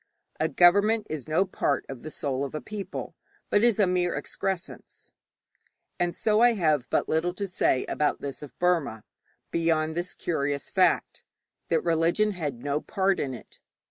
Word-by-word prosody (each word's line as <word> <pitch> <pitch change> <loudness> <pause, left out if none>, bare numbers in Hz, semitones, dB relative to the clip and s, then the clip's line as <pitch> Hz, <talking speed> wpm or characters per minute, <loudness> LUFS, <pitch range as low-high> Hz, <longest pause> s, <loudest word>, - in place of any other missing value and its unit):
A 160 +1 +1
government 205 +6 +4
is 155 -3 -4
no 160 +5 +2
part 145 -6 -1
of 135 -3 -8
the 155 - -7
soul 140 -3 -2
of 140 - -5
the 155 - -3
people, 210 +1 -6 0.4
but 205 - +4
is 235 -4 +4
a 205 - +4
mere 180 -1 +1
excrescence; 190 -2 -5 0.9
and 175 -1 0
so 215 0 +2
I 240 0 +6
have 155 - +1
but - - +1
little 175 +3 0
to 200 0 -3
say 175 -8 +1
about 150 - 0
this 140 -1 -5
of 150 - -11
Burma, 165 -11 +1 0.5
beyond 160 -1 +1
this 175 +1 -3
curious 145 -4 -2
fact - - +2 0.4
that 165 - +1
religion 170 +5 +2
had 145 -10 -4
no 145 +1 -1
part 195 -1 0
in 130 -2 -2
it. - - -14
165 Hz, 170 wpm, -27 LUFS, 145-190 Hz, 0.9 s, I